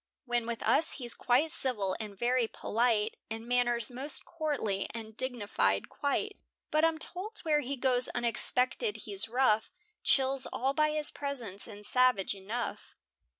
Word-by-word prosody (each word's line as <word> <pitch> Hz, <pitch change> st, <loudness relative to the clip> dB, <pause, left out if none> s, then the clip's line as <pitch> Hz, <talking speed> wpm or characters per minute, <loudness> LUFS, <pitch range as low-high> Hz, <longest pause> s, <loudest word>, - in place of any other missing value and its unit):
When 240 Hz, -2 st, -1 dB
with 235 Hz, -2 st, -4 dB
us 325 Hz, -, +4 dB
he's 240 Hz, -4 st, -3 dB
quite 265 Hz, +6 st, +1 dB
civil 215 Hz, -, 0 dB
and 210 Hz, -3 st, -7 dB
very 240 Hz, +2 st, +1 dB
polite, 225 Hz, -1 st, 0 dB
In 225 Hz, +1 st, -6 dB
manners 240 Hz, -2 st, +2 dB
most 265 Hz, +3 st, -1 dB
courtly, 285 Hz, -, -2 dB
and 220 Hz, -1 st, -7 dB
dignified 205 Hz, -, -1 dB
quite; 400 Hz, +9 st, -2 dB, 0.3 s
But 310 Hz, +1 st, +2 dB
I'm 325 Hz, -1 st, +3 dB
told 370 Hz, +7 st, -6 dB
were 305 Hz, -2 st, +3 dB
he 280 Hz, 0 st, -3 dB
goes 250 Hz, -1 st, +3 dB
unexpected 240 Hz, -1 st, +2 dB
he's 205 Hz, +1 st, +1 dB
rough, 230 Hz, -3 st, +2 dB, 0.3 s
Chills 270 Hz, 0 st, +3 dB
all 270 Hz, +2 st, -1 dB
by 305 Hz, +1 st, +2 dB
his 300 Hz, -1 st, +4 dB
presence, 245 Hz, -9 st, -5 dB
and 210 Hz, -2 st, -10 dB
savage 250 Hz, -5 st, +2 dB
enough. 210 Hz, +5 st, -5 dB
245 Hz, 150 wpm, -30 LUFS, 220-275 Hz, 0.3 s, us